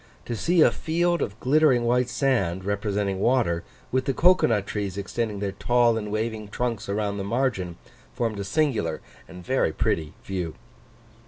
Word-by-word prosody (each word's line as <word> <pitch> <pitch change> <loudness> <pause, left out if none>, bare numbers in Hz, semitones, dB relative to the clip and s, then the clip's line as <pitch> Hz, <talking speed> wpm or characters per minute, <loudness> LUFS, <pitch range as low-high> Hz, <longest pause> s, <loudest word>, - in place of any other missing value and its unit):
To 120 - -3
see 170 - +2
a - - +6
field 175 +2 0
of 105 +3 -3
glittering 135 -2 +4
white 125 +1 +2
sand, 95 -11 0
representing 100 -1 -1
water, 115 -7 +2 0.3
with 130 0 +1
the 135 - 0
cocoa 180 +2 +5
nut 105 -4 +1
trees 100 -3 -3
extending 105 +1 -2
their 100 0 -2
tall 120 +3 +2
and 105 -2 -4
waving 110 0 -2
trunks 110 -1 -3
around 100 0 -1
the - - -2
margin, 100 -6 -1 0.3
formed 115 -4 -2
a - - -2
singular 110 - 0 0.3
and 90 -1 -11
very 130 -10 +1
pretty 80 +1 -1
view. 90 -5 -4
110 Hz, 165 wpm, -25 LUFS, 100-125 Hz, 0.3 s, a